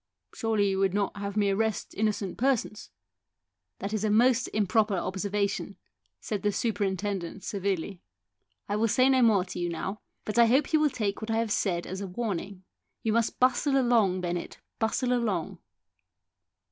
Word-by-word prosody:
" -, -, -55 dB
Surely 220 Hz, -3 st, +1 dB
you 190 Hz, -, -1 dB
would 195 Hz, -1 st, +2 dB
not 205 Hz, -1 st, 0 dB
have 200 Hz, +1 st, -4 dB
me 200 Hz, -1 st, +3 dB
arrest 220 Hz, +1 st, -1 dB
innocent 210 Hz, -2 st, -1 dB
persons? 245 Hz, -5 st, -1 dB, 0.5 s
" -, -, -58 dB
"That 200 Hz, +2 st, -5 dB
is 215 Hz, -1 st, -1 dB
a 215 Hz, -, +1 dB
most 240 Hz, +4 st, +4 dB
improper 210 Hz, 0 st, +1 dB
observation," 200 Hz, +1 st, -2 dB, 0.4 s
said 210 Hz, -3 st, -4 dB
the 205 Hz, -, +1 dB
superintendent 200 Hz, -4 st, -2 dB
severely. 195 Hz, -2 st, -3 dB, 0.3 s
" -, -, -50 dB
1 205 Hz, +1 st, -2 dB
will 230 Hz, -, +3 dB
say 255 Hz, +4 st, +4 dB
no 260 Hz, -1 st, +4 dB
more 210 Hz, -6 st, +4 dB
to 180 Hz, -, -7 dB
you 175 Hz, 0 st, -1 dB
now. 190 Hz, +5 st, -4 dB, 0.2 s
But 215 Hz, +2 st, 0 dB
I 235 Hz, -, +7 dB
hope 270 Hz, +6 st, +2 dB
you 310 Hz, -, +5 dB
will 305 Hz, -1 st, +3 dB
take 210 Hz, -6 st, -2 dB
what 220 Hz, -, -5 dB
I 225 Hz, -, +1 dB
have 225 Hz, -2 st, 0 dB
said 175 Hz, -4 st, 0 dB
as 190 Hz, +2 st, -5 dB
a 200 Hz, -, -4 dB
warning. 195 Hz, -2 st, -4 dB, 0.4 s
You 220 Hz, -, +1 dB
must 230 Hz, 0 st, 0 dB
bustle 270 Hz, +2 st, +3 dB
along, 225 Hz, -7 st, +3 dB
Bennett, 175 Hz, -1 st, -4 dB, 0.2 s
bustle 245 Hz, +3 st, +1 dB
along." 215 Hz, -9 st, -1 dB
205 Hz, 180 wpm, -28 LUFS, 195-230 Hz, 0.5 s, I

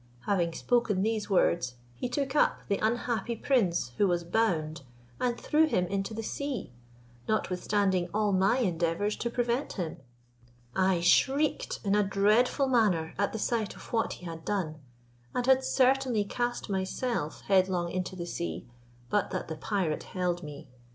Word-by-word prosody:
Having 170 Hz, +2 st, 0 dB
spoken 210 Hz, 0 st, +1 dB
these 215 Hz, -1 st, -1 dB
words, 170 Hz, -9 st, +2 dB, 0.2 s
he 180 Hz, -, -4 dB
took 275 Hz, +1 st, -2 dB
up -, -, +3 dB
the 200 Hz, -, 0 dB
unhappy 235 Hz, 0 st, 0 dB
prince, 195 Hz, -, +1 dB
who 205 Hz, -, +5 dB
was 175 Hz, -1 st, 0 dB
bound, 165 Hz, -6 st, 0 dB, 0.4 s
and 245 Hz, -1 st, 0 dB
threw 315 Hz, +1 st, +3 dB
him 180 Hz, -11 st, +1 dB
into 195 Hz, +4 st, -3 dB
the 225 Hz, -, -4 dB
sea, 260 Hz, -, -4 dB, 0.6 s
notwithstanding 190 Hz, -2 st, +1 dB
all 210 Hz, 0 st, +1 dB
my 190 Hz, +5 st, +3 dB
endeavours 180 Hz, -1 st, 0 dB
to 235 Hz, -, -2 dB
prevent 245 Hz, +3 st, -1 dB
him. 175 Hz, -5 st, -4 dB, 0.8 s
I 185 Hz, -2 st, +2 dB
shrieked 275 Hz, -, +2 dB
in 200 Hz, -1 st, +1 dB
a 210 Hz, -, +4 dB
dreadful 210 Hz, +7 st, +3 dB
manner 205 Hz, -11 st, +2 dB
at 200 Hz, -, +1 dB
the -, -, -4 dB
sight 220 Hz, -1 st, -1 dB
of -, -, -13 dB
what 225 Hz, -1 st, +1 dB
he 180 Hz, -, -11 dB
had 165 Hz, -1 st, -7 dB
done, 160 Hz, -7 st, -2 dB, 0.6 s
and 245 Hz, -, 0 dB
had 265 Hz, 0 st, +5 dB
certainly 260 Hz, -4 st, +2 dB
cast 240 Hz, +4 st, -2 dB
myself 190 Hz, -, -2 dB
headlong 185 Hz, -3 st, +2 dB
into 185 Hz, +1 st, -3 dB
the 175 Hz, -2 st, -5 dB
sea, 85 Hz, -, -4 dB, 0.5 s
but 205 Hz, -2 st, +1 dB
that 185 Hz, -4 st, -4 dB
the 160 Hz, -, -3 dB
pirate 175 Hz, -2 st, -1 dB, 0.2 s
held 175 Hz, -1 st, 0 dB
me. 145 Hz, -4 st, -9 dB
200 Hz, 160 wpm, -29 LUFS, 175-235 Hz, 0.8 s, who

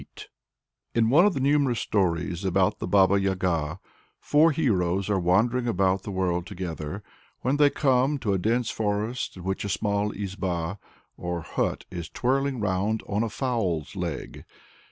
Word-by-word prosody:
In 115 Hz, 0 st, +3 dB
one 170 Hz, +8 st, +6 dB
of 205 Hz, -, 0 dB
the -, -, -1 dB
numerous 135 Hz, -3 st, +2 dB
stories 90 Hz, -2 st, 0 dB
about 95 Hz, 0 st, +1 dB
the -, -, -3 dB
Baba 100 Hz, +1 st, +4 dB
Yaga, 90 Hz, -4 st, -1 dB, 0.4 s
four 155 Hz, +3 st, +4 dB
heroes 100 Hz, -, 0 dB
are 100 Hz, -, +2 dB
wandering 115 Hz, +8 st, +2 dB
about 95 Hz, -3 st, +1 dB
the -, -, -8 dB
world 90 Hz, -2 st, -1 dB
together; 90 Hz, -1 st, -5 dB, 0.4 s
when 130 Hz, +3 st, +1 dB
they 145 Hz, -1 st, +6 dB
come 135 Hz, 0 st, +2 dB
to 110 Hz, -7 st, -1 dB
a 95 Hz, -, +1 dB
dense 115 Hz, +5 st, 0 dB
forest 105 Hz, +2 st, -2 dB
in 90 Hz, -, -9 dB
which 95 Hz, +1 st, -2 dB
a 100 Hz, -, -3 dB
small 105 Hz, 0 st, 0 dB
izba, 95 Hz, -2 st, -3 dB, 0.4 s
or 85 Hz, -1 st, -3 dB
hut, -, -, -2 dB
is 85 Hz, -3 st, -6 dB
twirling 135 Hz, +1 st, 0 dB
round 105 Hz, +2 st, 0 dB
on 105 Hz, +1 st, 0 dB
"a 115 Hz, -, 0 dB
fowl's 105 Hz, -, -2 dB
leg." 85 Hz, -6 st, -5 dB
100 Hz, 155 wpm, -26 LUFS, 90-120 Hz, 0.4 s, one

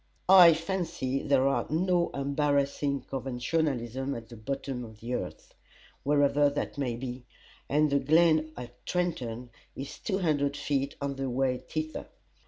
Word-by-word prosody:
I 180 Hz, -4 st, +9 dB
fancy 165 Hz, -6 st, -2 dB
there 135 Hz, -2 st, +3 dB
are 140 Hz, -, 0 dB
no 175 Hz, +2 st, +2 dB
embarrassing 140 Hz, 0 st, 0 dB
conventionalisms 130 Hz, 0 st, -2 dB
at 115 Hz, -1 st, -10 dB
the 120 Hz, -, -10 dB
bottom 130 Hz, +2 st, -4 dB
of 110 Hz, -2 st, -11 dB
the 120 Hz, +3 st, -5 dB
earth -, -, -5 dB, 0.5 s
wherever 145 Hz, 0 st, +3 dB
that 140 Hz, -, -3 dB
may 125 Hz, -4 st, -1 dB
be 125 Hz, +1 st, -6 dB, 0.5 s
and 150 Hz, +1 st, +3 dB
the 140 Hz, -, +3 dB
glen 155 Hz, +2 st, +3 dB
at 120 Hz, 0 st, -10 dB
Trenton 125 Hz, -10 st, -2 dB, 0.2 s
is 135 Hz, +1 st, -7 dB
two 190 Hz, -, -1 dB
hundred 145 Hz, -6 st, 0 dB
feet 140 Hz, -1 st, -1 dB
on 140 Hz, -1 st, -2 dB
the 135 Hz, -1 st, -2 dB
way 125 Hz, 0 st, 0 dB
thither. 155 Hz, 0 st, -5 dB
140 Hz, 145 wpm, -29 LUFS, 130-155 Hz, 0.5 s, I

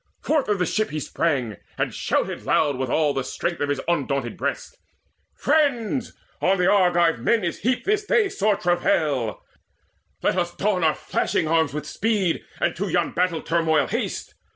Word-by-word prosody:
Forth 300 Hz, -7 st, 0 dB
of 205 Hz, -, +2 dB
the 180 Hz, -, +1 dB
ship 215 Hz, +5 st, 0 dB
he 155 Hz, -, -3 dB
sprang, 135 Hz, -, -1 dB, 0.2 s
and -, -, -1 dB
shouted -, -, -1 dB
loud 145 Hz, -3 st, +2 dB
With 130 Hz, 0 st, -3 dB
all 150 Hz, +1 st, +2 dB
the 135 Hz, -, -1 dB
strength 170 Hz, +5 st, -3 dB
of 145 Hz, -, 0 dB
his 145 Hz, -2 st, 0 dB
undaunted 140 Hz, -7 st, -1 dB
breast: -, -, -4 dB, 0.6 s
"Friends, 275 Hz, -5 st, +1 dB, 0.3 s
on 195 Hz, +1 st, +3 dB
the 180 Hz, -, +2 dB
Argive 175 Hz, -, +3 dB
men 215 Hz, -, +2 dB
is 170 Hz, -, -2 dB
heaped 250 Hz, +3 st, 0 dB
this 420 Hz, +1 st, +1 dB
day 445 Hz, 0 st, +3 dB
Sore 210 Hz, -, +1 dB
travail! 155 Hz, -, 0 dB, 0.8 s
Let 185 Hz, -, +2 dB
us 175 Hz, 0 st, -2 dB
don 195 Hz, -4 st, 0 dB
our 155 Hz, -1 st, +3 dB
flashing 155 Hz, -, -1 dB
arms 160 Hz, -2 st, +2 dB
With 150 Hz, 0 st, -5 dB
speed, 200 Hz, -1 st, 0 dB, 0.2 s
and -, -, 0 dB
to 200 Hz, +2 st, -2 dB
yon 175 Hz, -1 st, +1 dB
battle 180 Hz, -2 st, 0 dB
turmoil 165 Hz, -2 st, +2 dB
haste. -, -, -3 dB
175 Hz, 175 wpm, -23 LUFS, 150-210 Hz, 0.8 s, on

